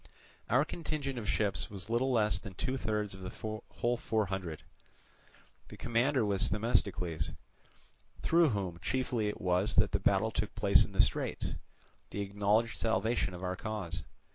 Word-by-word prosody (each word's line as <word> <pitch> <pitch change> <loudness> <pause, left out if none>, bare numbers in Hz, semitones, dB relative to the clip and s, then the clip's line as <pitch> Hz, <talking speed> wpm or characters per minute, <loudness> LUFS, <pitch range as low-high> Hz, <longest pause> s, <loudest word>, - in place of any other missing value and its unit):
Our 130 +5 +4
contingent 150 -6 -3
of 105 - -4
ships 100 -4 +1
was 100 -2 -5
little 120 +4 +1
less 105 -6 +3
than 100 -2 -9
two 130 +7 -1
thirds 105 -5 -1
of 95 - -10
the 110 +3 -5
whole 120 +1 0
four 110 -2 0
hundred; 90 -5 -4 1.0
the - - -11
commander 120 +1 +2
was 100 0 +3
Themistocles, 90 -7 0 0.9
through 165 -1 +5
whom 95 -6 -2
chiefly 125 -3 0
it 105 - -3
was 90 +2 +1
that - - +4
the - - +1
battle - - +2
took - - -2
place - - +5
in - - -8
the - - +5
straits, - - 0 0.6
the 100 - -3
acknowledged 105 +3 +1
salvation 110 -3 +1
of 90 - -8
our 90 0 -1
cause. 105 -5 -4
105 Hz, 160 wpm, -32 LUFS, 95-120 Hz, 1.0 s, through